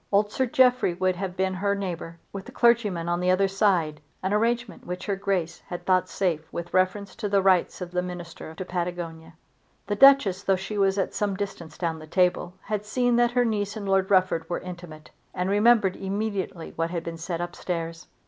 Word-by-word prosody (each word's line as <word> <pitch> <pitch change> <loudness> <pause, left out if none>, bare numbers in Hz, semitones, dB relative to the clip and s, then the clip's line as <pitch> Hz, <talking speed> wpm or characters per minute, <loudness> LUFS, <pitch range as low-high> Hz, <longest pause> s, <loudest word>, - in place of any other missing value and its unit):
Old 205 +1 +3
Sir 260 +3 0
Jeffrey 250 -7 +3
should 185 0 +1
have 185 -1 -4
been 190 0 +1
her 200 +2 0
neighbour, 170 -4 -5 0.2
with 195 -1 -6
the - - -10
clergyman 215 -8 +2
on 175 0 0
the 180 0 +1
other 190 +2 +4
side, 185 -6 +1 0.2
an 190 +2 0
arrangement 235 +1 0
which 180 +1 -5
Her 200 - 0
Grace 190 -4 -2
had 175 - -6
thought 185 -1 +2
safe 165 -5 -1
with 170 0 -6
reference 185 +2 +1
to 215 -2 -3
the 200 0 +3
rights 185 -1 +2
of 175 -1 -5
the 180 0 0
Minister 175 -3 -8
to 185 - -5
Patagonia. 170 -2 -4 0.5
The 205 - -1
Duchess, 245 -7 +6
though 195 -1 +2
she 190 +3 -5
was 195 -1 +2
at 195 - -1
some 205 -2 -1
distance 175 -6 -6
down 165 -2 -2
the 155 - -11
table, 180 +1 +1
had 210 0 -3
seen 245 +3 +1
that 240 0 +3
her 245 0 +3
niece 210 -1 -1
and 205 -2 -5
Lord 195 0 +2
Rufford 185 -4 +2
were 175 - -2
intimate, 175 -4 -10 0.2
and 180 +1 -1
remembered 205 -2 +4
immediately 195 -3 -3
what 165 0 -1
had 170 -1 -3
been 165 0 -6
said 170 0 -3
up 175 0 -4
stairs. 165 -1 -4
185 Hz, 205 wpm, -26 LUFS, 175-205 Hz, 0.5 s, Duchess